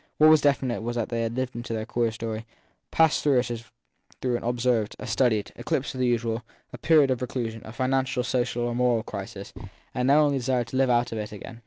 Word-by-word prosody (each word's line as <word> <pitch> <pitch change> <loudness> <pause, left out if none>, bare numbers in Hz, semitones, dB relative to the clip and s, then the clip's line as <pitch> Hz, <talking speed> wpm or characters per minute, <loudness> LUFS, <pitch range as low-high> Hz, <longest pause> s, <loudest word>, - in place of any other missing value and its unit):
What 155 +1 +7
was 155 -2 +6
definite 130 -4 +1
was 120 +1 -3
that 120 -2 -1
they 115 -1 -1
had 115 0 -2
lived 130 -1 -2
into 120 -1 -5
their 110 -1 -2
queer 120 0 0
story, 110 0 -5 0.4
passed 160 -2 +3
through 140 -3 +3
it 125 0 +1
as 115 -1 -5 0.5
through 125 -2 0
an - - -2
observed, 120 -2 0
a - - -7
studied, 110 -6 +1
eclipse - - -2
of 130 - -7
the 125 - +2
usual, 115 -1 0 0.3
a - - -8
period 150 -5 +4
of 130 - -1
reclusion, 115 -3 -3
a 110 - -9
financial, 130 +1 0
social, 120 -1 -1
or 120 0 -1
moral 120 -2 +2
crisis, 100 -1 -7 0.4
and 125 +1 0
only 145 -1 +4
desired 125 -2 0
now - - -13
to 130 - -2
live 135 -1 +3
out 120 0 +2
of 110 - -3
it 105 - -5
again. 110 +2 -9
120 Hz, 230 wpm, -26 LUFS, 115-130 Hz, 0.5 s, What